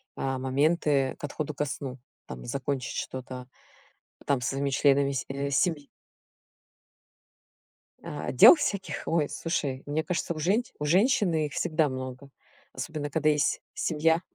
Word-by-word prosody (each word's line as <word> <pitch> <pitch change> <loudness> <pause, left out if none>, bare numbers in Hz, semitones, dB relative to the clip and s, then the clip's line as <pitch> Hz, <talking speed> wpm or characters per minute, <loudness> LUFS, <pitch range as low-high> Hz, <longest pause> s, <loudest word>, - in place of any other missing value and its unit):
а, 135 -1 -2
моменты 140 +1 +1
к - - -19
отходу 150 +1 -4
ко 150 - -1
сну, 135 -2 -5 0.3
там 60 -1 -8
и - - -10
закончить 135 - -3
что-то 130 -1 -6 0.8
там 140 -3 +2
со 125 - -1
своими 140 +1 -1
членами 140 0 +3
се 140 +1 -3
семьи. 145 0 +1 2.2
А. - - -4
Дел - - +9
всяких, 200 -10 -2
ой, 155 -3 +1
слушай, 140 -5 -2
мне 150 +2 -1
кажется, 175 -1 -2
у 155 - -7
женщ 205 +10 +1
у 150 - -2
женщины 180 - +3
их 145 - -12
всегда 155 -2 +1
много, 130 +1 -6 0.4
особенно 150 -2 -4
когда 155 +1 +1
есть 150 -1 +1
семья. 160 +1 +1
145 Hz, 140 wpm, -28 LUFS, 135-160 Hz, 2.2 s, Дел